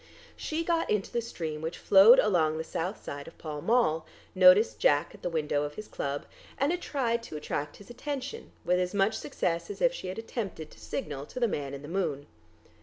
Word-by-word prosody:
She 320 +1 -3
got 335 -1 0
into 210 -2 0
the 235 - 0
stream 160 -9 -5
which 160 +1 -4
flowed 205 +6 +8
along 165 -9 +3
the 160 - -2
south 175 +5 -4
side 140 0 -6
of 165 - -12
Pall 150 -2 -6
Mall, 220 -9 +2 0.3
noticed 185 +3 +6
Jack 145 0 +3
at - - -14
the 175 - -2
window 150 -3 0
of 150 0 -4
his 215 - -7
club, 140 0 -4 0.3
and 280 +3 +2
tried 235 -7 0
to 195 -9 -7
attract 150 0 -4
his 205 +3 -13
attention 280 - -5
with 180 +1 +3
as 180 +2 -1
much 200 +2 +3
success 170 -10 -2
as 200 -1 -6
if 260 0 +3
she 190 - -6
had 185 - -5
attempted 205 -8 -5
to - - -16
signal 145 -1 -5
to - - -7
the 240 - +3
man 140 -8 -3
in 140 - -9
the - - -8
moon. 160 -5 -2
185 Hz, 210 wpm, -29 LUFS, 155-230 Hz, 0.3 s, flowed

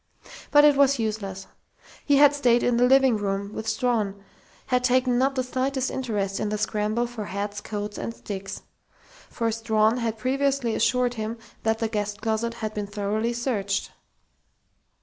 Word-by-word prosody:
But 290 0 +6
it 295 -1 +6
was 280 0 +4
useless. 205 -4 -3 0.6
He 285 - +3
had 290 0 +7
stayed 245 -4 +3
in 245 -1 +2
the 245 +1 +4
living 265 -3 +5
room 200 0 -3
with 220 - -5
Strawn, 220 -3 0 0.5
had 250 -1 +1
taken 250 -1 +2
not 270 +1 +2
the 255 - 0
slightest 260 +1 -1
interest 205 -6 -2
in 215 - -1
the 210 - -1
scramble 215 +2 0
for 235 -3 -6
hats, 205 +1 -4
coats 205 0 -5
and - - -3
sticks. 195 -3 -7 0.7
For 230 -1 -1
Strawn 220 0 +2
had 230 -2 -2
previously 270 0 0
assured 245 +2 +2
him 220 0 -4 0.2
that 220 0 +1
the 225 0 -1
guest 205 -2 -3
closet 225 +1 -1
had 215 -2 -4
been 210 -1 -4
thoroughly 210 +3 -1
searched. 210 -5 -2
225 Hz, 165 wpm, -25 LUFS, 210-250 Hz, 0.7 s, had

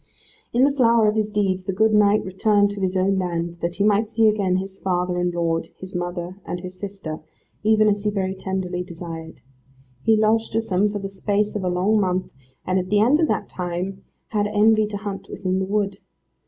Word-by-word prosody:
In 245 +2 +3
the 280 - +5
flower 235 -5 +4
of 210 - +3
his 215 -1 0
deeds 195 -3 0
the 195 - -2
good 220 +3 +3
knight 210 0 +4
returned 205 +2 +2
to 200 -1 -6
his 190 0 0
own 190 +1 +2
land, 170 -1 -2
that 170 +1 -2
he 200 - 0
might 210 +1 +3
see 225 0 +3
again 200 -4 +2
his 190 +1 -4
father 180 -1 0
and 175 0 +1
lord, 165 -1 -1
his 185 0 -9
mother 175 +1 -4
and 175 - -4
his 180 0 -8
sister, 190 -6 -6 0.4
even 215 0 +4
as 205 -1 +1
he 210 - +1
very 190 -2 -1
tenderly 190 -2 -3
desired. 165 -2 -8 0.6
He 220 +8 +4
lodged 220 +1 +1
with 225 0 -1
them 195 +2 +2
for 205 - -3
the 195 -1 -4
space 205 +2 -1
of 205 - -2
a 180 - 0
long 190 +5 +2
month, 185 -2 -1 0.3
and 185 +1 +1
at 185 0 -4
the 205 - +3
end 250 +8 +4
of 320 - +3
that - - -1
time 180 +2 -4 0.3
had 205 -2 0
envy 215 +1 +4
to 205 -1 -4
hunt 200 -1 -6
within 185 -1 -2
the 190 - 0
wood. 200 -1 -1
195 Hz, 215 wpm, -23 LUFS, 180-210 Hz, 0.6 s, the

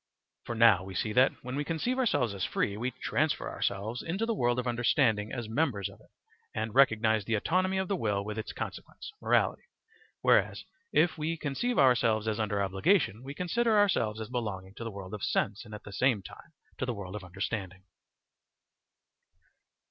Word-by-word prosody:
For 120 - -4
now 110 -5 +6
we 95 0 -8
see 105 +4 -1
that, 130 +3 +5
when 125 +1 -5
we 145 - -1
conceive 170 - -1
ourselves 145 - +1
as 95 -2 -4
free, 100 - 0
we 120 +4 -2
transfer 140 +4 -1
ourselves 105 +5 -2
into 190 +7 -2
the 230 - 0
world 120 - +1
of 125 - -1
understanding 120 -3 +2
as 120 -3 -4
members 110 - 0
of - - -15
it - - -22 0.5
and 110 0 -2
recognise 110 -5 +4
the 115 - +1
autonomy 185 - +1
of 190 0 0
the 200 - 0
will 105 - -1
with 105 +1 -4
its 110 - -5
consequence, - - -7
morality; - - +2 0.6
whereas, - - +3 0.3
if 160 +1 +3
we 160 +2 -1
conceive 160 - -2
ourselves 115 -4 +4
as 110 0 -1
under 105 -2 0
obligation, 100 - +2
we 135 +2 -8
consider 220 +6 +1
ourselves 115 - +2
as 110 - -5
belonging 105 -6 -4
to 115 - -8
the 115 - -4
world 100 -2 -8
of 105 - -5
sense 100 0 0
and 105 - -9
at 105 - -10
the 100 - -10
same 120 -3 +2
time 165 - -12 0.3
to - - 0
the 120 - -2
world 95 -1 -7
of 105 - -6
understanding. 95 0 -4
115 Hz, 185 wpm, -30 LUFS, 105-145 Hz, 0.6 s, now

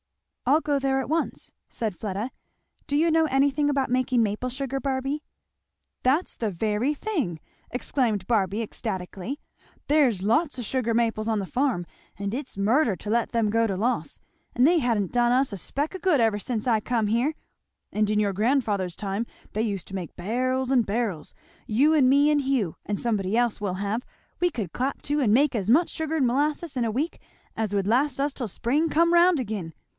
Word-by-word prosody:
"I'll 295 +5 +5
go 290 -2 0
there 270 0 +1
at 265 - -3
once," 320 +4 -2 0.2
said 220 -5 -3
Fleda. 210 +6 -4 0.6
"Do 285 -1 +1
you 330 +2 +3
know 320 0 +4
anything 280 +1 +2
about 275 -3 0
making 255 -1 +2
maple 215 +4 -2
sugar, 270 +1 -3
Barby?" 270 +2 -2 0.8
"That's 280 +8 +1
the 225 - -2
very 210 - 0
thing!" 290 - -2 0.3
exclaimed 235 -6 -1
Barby 210 -2 +1
ecstatically. 210 +3 -5 0.5
"There's 265 -11 +3
lots 260 - +2
o' - - -3
sugar 235 0 0
maples 225 -1 +1
on 220 - +1
the 195 - -3
farm 245 -5 0 0.3
and 200 +1 -3
it's 260 -4 -5
murder 225 +3 +3
to 210 - -7
let 230 +1 +1
them 230 -3 +1
go 230 +1 +3
to 195 -3 -2
loss; 240 +6 -1 0.3
and 245 - +4
they 340 +1 +4
ha'n't 225 - 0
done 240 0 +3
us 255 -2 +2
a - - -4
speck 290 - -3
o' - - -5
good 360 -6 +3
ever 220 -3 +2
since 225 +1 -3
I 225 -3 +3
come 230 -1 0
here. 240 +8 +1 0.6
And 215 0 +1
in 210 0 +2
your 205 -2 +1
grandfather's 210 -5 0
time 205 +3 -3 0.3
they 215 - 0
used 200 -5 -2
to 195 - -6
make 180 -4 -6
barrels 255 +7 -1
and 250 -4 +4
barrels. 200 -7 -2 0.3
You 275 +9 +3
and 275 -5 +5
me 285 +2 +5
and 295 -1 +3
Hugh, 260 - 0
and 205 -1 -2
somebody 215 -3 0
else 240 -3 +1
we'll 195 -3 -1
have, 205 +4 -2 0.4
we 355 - +4
could 215 - -5
clap 265 +3 -2
to 290 +1 0
and 215 -6 +3
make 275 +2 +3
as 205 -2 -1
much 320 +9 +5
sugar 320 0 -2
and 265 -5 +3
molasses 290 +5 0
in 250 - 0
a 225 - 0
week 290 +9 -2 0.3
as 215 -2 -2
would 200 -1 0
last 275 +6 +2
us 285 0 0
till 245 -6 -4
spring 290 - 0
come 335 +3 +3
round 345 -1 +5
again. 200 -9 -4
240 Hz, 200 wpm, -26 LUFS, 210-280 Hz, 0.8 s, I'll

